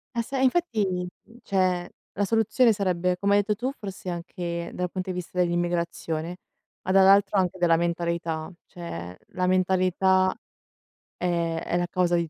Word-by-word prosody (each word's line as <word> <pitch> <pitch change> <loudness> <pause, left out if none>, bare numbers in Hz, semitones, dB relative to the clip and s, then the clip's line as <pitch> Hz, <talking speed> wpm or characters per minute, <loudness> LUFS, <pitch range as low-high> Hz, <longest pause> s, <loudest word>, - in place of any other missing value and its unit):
Ah 235 - +1
se 270 +3 -4
eh, - - +2
infatti, 215 - +1 0.3
cioè 185 -2 0 0.3
la 205 - +1
soluzione 225 +3 +3
sarebbe, 180 -3 0
come 200 +2 +1
hai 205 - +6
detto 210 +1 0
tu, 250 +5 -2
forse 195 -4 -6
anche 170 0 -4
dal 180 -1 -3
punto 185 0 -4
di 180 - -2
vista 180 0 -5
dell'immigrazione, 175 -1 -1 0.5
ma 185 - -1
dall'altro 195 +1 +5
anche 185 0 0
della 170 -2 +4
mentalità, 170 -1 -2
cioè 90 - -7
la 180 0 -1
mentalità 185 0 +3 0.9
è 170 -2 0
è - - -1
la 175 0 0
causa 180 0 +1
di 170 -2 0
180 Hz, 155 wpm, -26 LUFS, 170-195 Hz, 0.9 s, hai